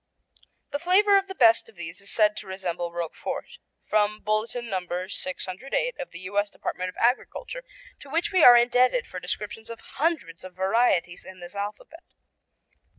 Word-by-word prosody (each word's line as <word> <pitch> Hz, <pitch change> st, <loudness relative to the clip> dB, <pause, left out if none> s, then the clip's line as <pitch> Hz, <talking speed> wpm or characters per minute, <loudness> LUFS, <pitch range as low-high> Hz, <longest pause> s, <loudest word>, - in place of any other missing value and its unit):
The 285 Hz, -, -2 dB
flavor 395 Hz, +5 st, +4 dB
of 390 Hz, 0 st, +3 dB
the 385 Hz, -, -7 dB
best 230 Hz, -5 st, +5 dB
of 225 Hz, -, -19 dB
these 175 Hz, +1 st, -8 dB
is 200 Hz, -, -9 dB
said 210 Hz, -1 st, +3 dB
to -, -, -7 dB
resemble 175 Hz, -2 st, -3 dB
Roquefort. 170 Hz, -1 st, -5 dB, 0.3 s
(From 215 Hz, 0 st, +1 dB
Bulletin 220 Hz, +3 st, -1 dB
No. 190 Hz, -4 st, -1 dB, 0.3 s
608 195 Hz, -, -3 dB
of 275 Hz, -, -5 dB
the 170 Hz, -, -10 dB
U.S. 205 Hz, +2 st, -1 dB
Department 185 Hz, -2 st, -4 dB
of -, -, -11 dB
Agriculture, -, -, -1 dB, 0.4 s
to 280 Hz, -, -13 dB
which 335 Hz, +8 st, 0 dB
we 370 Hz, -4 st, +4 dB
are 245 Hz, -1 st, +11 dB
indebted 245 Hz, 0 st, +3 dB
for 180 Hz, -, -7 dB
descriptions 210 Hz, +5 st, -5 dB
of 230 Hz, -1 st, -7 dB, 0.2 s
hundreds 300 Hz, -, -1 dB
of 185 Hz, -1 st, -10 dB
varieties 190 Hz, -2 st, +1 dB
in 190 Hz, 0 st, -12 dB
this 175 Hz, +1 st, -10 dB
alphabet.) 205 Hz, -, -6 dB
215 Hz, 165 wpm, -26 LUFS, 185-255 Hz, 0.4 s, are